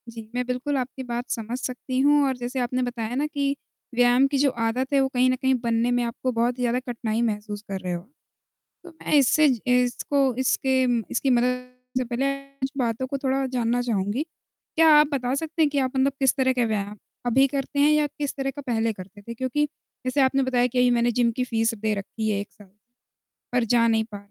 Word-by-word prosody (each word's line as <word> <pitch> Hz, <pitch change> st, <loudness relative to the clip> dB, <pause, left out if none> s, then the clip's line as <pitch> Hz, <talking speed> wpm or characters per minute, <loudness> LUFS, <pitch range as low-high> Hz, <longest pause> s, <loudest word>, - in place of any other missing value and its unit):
जी, 225 Hz, -1 st, -10 dB
मैं 250 Hz, 0 st, 0 dB
बिल्कुल 255 Hz, +3 st, -2 dB
आपकी 260 Hz, +1 st, -4 dB
बात 240 Hz, 0 st, -4 dB
समझ 230 Hz, +2 st, -3 dB
सकती 255 Hz, 0 st, -3 dB
हूँ, 290 Hz, +1 st, +5 dB
और 260 Hz, -1 st, -1 dB
जैसे 245 Hz, +2 st, -4 dB
आपने 250 Hz, +1 st, -1 dB
बताया 240 Hz, -1 st, -3 dB
ना 285 Hz, +3 st, 0 dB
कि 280 Hz, -2 st, -1 dB, 0.4 s
व्यायाम 245 Hz, +2 st, +5 dB
की 280 Hz, 0 st, -1 dB
जो 280 Hz, +1 st, +4 dB, 0.2 s
आदत 255 Hz, +5 st, -1 dB
है, 280 Hz, -, +5 dB
वो 270 Hz, -, +2 dB
कहीं 255 Hz, -1 st, +2 dB
न 255 Hz, -, +2 dB
कहीं 265 Hz, +1 st, +1 dB
बनने 235 Hz, 0 st, +1 dB
में 245 Hz, 0 st, +1 dB
आपको 235 Hz, +2 st, -2 dB
बहुत 240 Hz, +1 st, 0 dB
ही 250 Hz, -, -2 dB
ज़्यादा 245 Hz, +1 st, +1 dB
कठिनाई 235 Hz, -3 st, -3 dB
महसूस 210 Hz, -2 st, -2 dB
कर 195 Hz, -1 st, -3 dB
रहे 180 Hz, -1 st, -3 dB
हो, 175 Hz, -, -4 dB, 0.8 s
तो 355 Hz, -, -11 dB
मैं 320 Hz, -2 st, -5 dB
इससे 295 Hz, +2 st, +5 dB
ज 250 Hz, -3 st, 0 dB
इसको 250 Hz, +2 st, +2 dB
इसके 260 Hz, 0 st, +2 dB
म 240 Hz, -2 st, +1 dB
इसकी 270 Hz, -, 0 dB
मदद 250 Hz, 0 st, +1 dB, 0.3 s
से 255 Hz, -, +1 dB
पहले 260 Hz, +3 st, 0 dB, 0.3 s
कुछ 265 Hz, -, -1 dB
बातों 240 Hz, -1 st, -1 dB
को 275 Hz, -, -3 dB
थोड़ा 270 Hz, 0 st, 0 dB
जानना 245 Hz, -1 st, 0 dB
चाहूँगी। 220 Hz, +2 st, -1 dB, 0.5 s
क्या 325 Hz, 0 st, +5 dB
आप 300 Hz, -, +5 dB
बता 255 Hz, -2 st, -1 dB
सकते 320 Hz, +3 st, -3 dB
हैं 305 Hz, -, +4 dB
कि 285 Hz, -1 st, 0 dB
आप 260 Hz, -1 st, 0 dB
मतलब 265 Hz, +1 st, +3 dB
किस 265 Hz, -2 st, +3 dB
तरह 260 Hz, -1 st, +2 dB
के 245 Hz, -2 st, +1 dB
व्यायाम 210 Hz, -1 st, -2 dB, 0.3 s
अभी 255 Hz, +3 st, +4 dB
करते 275 Hz, +1 st, -3 dB
हैं, 290 Hz, +1 st, +5 dB
या 300 Hz, -1 st, +3 dB
किस 290 Hz, -1 st, -5 dB
तरह 270 Hz, -1 st, -2 dB
का 285 Hz, -, -8 dB
पहले 225 Hz, -2 st, 0 dB
करते 200 Hz, +1 st, -12 dB
थे? 235 Hz, +3 st, -7 dB
क्योंकि 260 Hz, +5 st, 0 dB, 0.4 s
जैसे 255 Hz, +2 st, +1 dB
आपने 270 Hz, +1 st, +3 dB
बताया 250 Hz, -1 st, +2 dB
कि, 250 Hz, -, -5 dB
"अभी 250 Hz, 0 st, +5 dB
मैंने 240 Hz, 0 st, +2 dB
जिम 235 Hz, 0 st, +2 dB
की 250 Hz, +2 st, -2 dB
फ़ीस 230 Hz, -2 st, 0 dB
दे 215 Hz, 0 st, -1 dB
रखी 215 Hz, +2 st, -4 dB
है 200 Hz, -, 0 dB
1 205 Hz, -, -7 dB
साल, 205 Hz, -3 st, -17 dB, 0.8 s
पर 245 Hz, 0 st, +2 dB
जा 230 Hz, 0 st, +3 dB
नहीं 225 Hz, -1 st, +2 dB
पा" 205 Hz, -, -6 dB
250 Hz, 225 wpm, -24 LUFS, 230-270 Hz, 0.8 s, हूँ